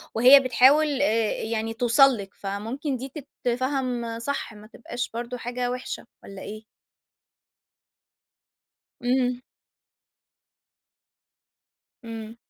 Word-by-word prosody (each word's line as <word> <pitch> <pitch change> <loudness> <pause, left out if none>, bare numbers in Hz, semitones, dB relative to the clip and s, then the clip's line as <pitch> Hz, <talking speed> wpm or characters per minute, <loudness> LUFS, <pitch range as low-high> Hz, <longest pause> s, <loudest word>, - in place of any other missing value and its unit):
وهي 255 +5 +9
بتحاول، 275 +3 +4
آآ 225 -5 +2
يعني 225 0 -2
توصل 245 +2 +4
لكِ، 195 -1 -8
فممكن 225 +8 -4
دي 265 +2 -7 0.3
تتفهم 245 -2 -1
صح، 275 -2 -3
ما 210 0 -13
تبقاش 240 +1 -6
برضه 240 +2 -4
حاجة 245 +1 -3
وحشة 250 +1 -5 0.2
والَّا 195 -1 -10
إيه؟ 215 +1 -8 2.4
امم. 250 0 +1 2.6
إمم. 225 0 -7
245 Hz, 90 wpm, -25 LUFS, 225-260 Hz, 2.6 s, وهي